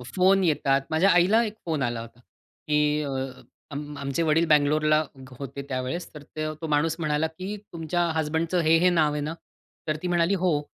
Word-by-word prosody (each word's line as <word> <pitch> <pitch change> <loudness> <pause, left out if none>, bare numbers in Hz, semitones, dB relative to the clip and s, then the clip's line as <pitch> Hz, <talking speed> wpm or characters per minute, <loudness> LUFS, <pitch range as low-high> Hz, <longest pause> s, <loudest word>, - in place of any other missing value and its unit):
Phone 190 +1 +4
येतात. 140 -4 +2
माझ्या 160 +5 +3
आईला 195 +6 +5
एक 210 - -4
फोन 160 -4 -1
आला 120 -1 -2
होता, 115 +1 -12
की 150 +4 -2
अ, 140 - -4 0.6
आम 145 +1 -6
आमचे 140 +3 -1
वडील 160 +1 +3
बंगलोरला 155 +1 +3 0.4
होते 140 0 -6
त्यावेळेस, 130 +7 -3
तर 150 -2 -10
त्य 155 0 -2
तो 160 - -3
माणूस 155 +1 +1
म्हणाला, 155 0 0
की 185 +6 -6 0.2
"तुमच्या 165 +1 -1
हसबँडचं 160 +3 0
हे, 165 0 +4
हे 180 +2 +4
नाव 155 -4 +2
आहे 150 - -2
ना?" 150 +2 -3 0.5
तर 155 - +1
ती - - -1
म्हणाली, 175 +1 +2
"हो." 175 -5 +1
155 Hz, 185 wpm, -26 LUFS, 150-170 Hz, 0.6 s, आईला